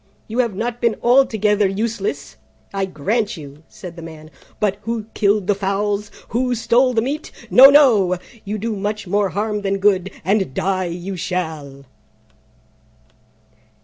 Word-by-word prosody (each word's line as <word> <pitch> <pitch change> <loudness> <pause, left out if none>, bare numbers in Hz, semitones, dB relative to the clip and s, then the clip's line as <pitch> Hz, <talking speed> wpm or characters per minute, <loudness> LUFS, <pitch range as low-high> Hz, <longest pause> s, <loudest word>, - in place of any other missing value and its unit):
"You 225 +3 -4
have 235 -6 +1
not 235 +3 -3
been 235 -3 +2
altogether 220 -5 +3
useless, 195 - -3 0.4
I 195 -1 0
grant 205 +6 -1
you," 145 -1 -11
said 180 -3 -10
the 170 - -9
Man: 160 -1 -11 0.3
"but 200 -2 0
who 230 0 -3
killed 205 -1 +2
the 205 - +2
fowls? 200 +1 -1 0.2
Who 250 +1 0
stole 245 +2 +2
the 225 - +2
meat? 290 +5 -4 0.2
No, 265 +2 +10
no! 225 -11 +5 0.3
You 210 +1 -4
do 220 +1 -3
much 210 +1 -3
more 200 +2 +1
harm 210 +3 -2
than 195 0 -1
good, 195 -2 +2 0.2
and 190 -7 0
die 185 -1 0
you 180 +2 -5
shall." 155 -6 -4
205 Hz, 145 wpm, -20 LUFS, 185-225 Hz, 0.4 s, No